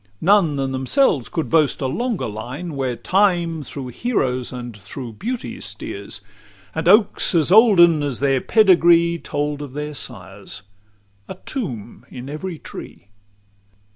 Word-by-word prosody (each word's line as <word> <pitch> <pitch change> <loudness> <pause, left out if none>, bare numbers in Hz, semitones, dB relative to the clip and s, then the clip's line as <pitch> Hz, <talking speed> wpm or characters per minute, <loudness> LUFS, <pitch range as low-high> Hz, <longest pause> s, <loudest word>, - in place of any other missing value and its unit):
None 185 -5 +3
than 135 -1 -2
themselves 135 - +1
could 160 - -2
boast 155 -3 +2
a 135 - -2
longer 230 - -2
line, 125 +10 -6
Where 130 -3 -2
time 175 - +1
through 135 -1 -7
heroes 130 - -1
and 120 -3 -7
through 115 +4 -8
beauties 235 - -5
steers; 100 -1 -5 0.5
And 160 +1 -3
oaks 205 -1 +4
as 165 0 +3
olden 180 -7 +6
as 140 -4 -2
their 135 -2 +2
pedigree 170 -5 +4
Told 145 -1 -3
of 140 -3 -8
their 150 +1 -5
sires, 100 -8 -6 0.6
a - - -7
tomb 125 - -6
in 125 +2 -8
every 165 +3 -5
tree. 100 - -11
150 Hz, 140 wpm, -21 LUFS, 125-175 Hz, 0.6 s, olden